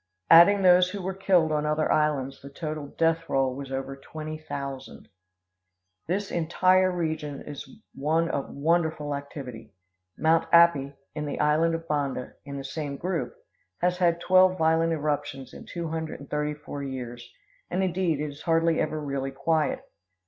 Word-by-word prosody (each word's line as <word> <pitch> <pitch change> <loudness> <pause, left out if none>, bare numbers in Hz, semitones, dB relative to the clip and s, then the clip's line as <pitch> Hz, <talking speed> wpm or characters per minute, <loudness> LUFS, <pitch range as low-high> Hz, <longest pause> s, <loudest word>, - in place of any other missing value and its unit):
Adding 195 +4 +8
those 180 0 +6
who 200 +2 -5
were 190 +1 -2
killed 185 -4 +2
on 150 -1 +1
other 150 +1 +1
islands, 145 -3 0
the 140 - -10
total 155 0 -5
death 165 +2 0
roll 135 -1 +1
was 135 0 -7
over 135 0 -4
twenty 155 +3 -7
thousand." 140 - -7 1.0
This 195 +4 -2
entire 185 +3 +3
region 155 -5 -3
is 145 -1 -8 0.2
one 160 +4 +1
of 140 -4 -3
wonderful 160 -1 0
activity. 130 -7 -8 0.4
Mount 165 +1 +3
Api, 160 -5 +5 0.2
in 150 -1 -4
the 145 - -4
island 160 +2 +3
of 165 0 -7
Banda, 140 -4 -2
in 140 -1 -6
the 135 - -5
same 140 0 -5
group, 180 0 -3 0.4
has 180 0 0
had 170 -2 +3
twelve 185 +1 +4
violent 160 0 +2
eruptions 145 -3 -3
in - - -11
two 170 -2 -4
hundred 160 0 -4
and 140 - -13
thirty 150 0 -1
four 145 -1 -7
years; 120 -3 -6 0.4
and, 185 +2 0
indeed, 180 -4 0
it 150 - -1
is 145 - -13
hardly 165 0 +2
ever 155 0 -1
really 140 -2 -3
quiet. 155 +3 0
155 Hz, 165 wpm, -26 LUFS, 140-165 Hz, 1.0 s, Adding